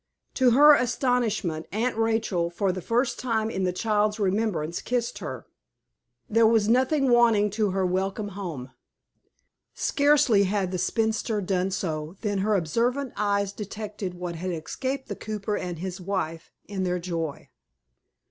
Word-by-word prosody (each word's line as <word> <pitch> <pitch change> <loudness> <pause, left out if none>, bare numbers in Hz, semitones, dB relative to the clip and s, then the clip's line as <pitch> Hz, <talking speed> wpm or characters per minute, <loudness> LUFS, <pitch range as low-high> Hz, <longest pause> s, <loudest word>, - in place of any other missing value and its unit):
To 260 -2 +4
her 290 +5 +8
astonishment, 235 - 0
Aunt 230 +4 0
Rachel, 225 -6 0
for 190 +2 0
the 185 0 -5
first 240 +4 0
time 225 -3 -1
in 190 -3 -1
the 180 - +1
child's 210 +2 0
remembrance, 190 -5 0
kissed 240 -1 -2
her. - - -6 0.8
There 225 +1 +4
was 220 -2 +3
nothing 260 +3 +3
wanting 225 -4 +4
to 210 0 0
her 190 0 0
welcome 195 +3 -1
home. 170 -10 -6 1.0
Scarcely 285 -8 +3
had 190 -1 -1
the 185 - -2
spinster 220 +2 0
done 185 -1 0
so 160 -3 -3
than 205 -3 -1
her 210 +2 +2
observant 240 - 0
eyes 200 -1 0
detected 205 -2 -6
what 175 -1 -5
had 185 +3 -4
escaped 260 - -4
the 205 - -4
cooper 210 0 -3
and 180 -3 -4
his 185 +2 -5
wife, 170 -4 -3 0.2
in 195 -1 -4
their 180 -1 0
joy. 165 -4 -4
205 Hz, 145 wpm, -26 LUFS, 185-230 Hz, 1.0 s, her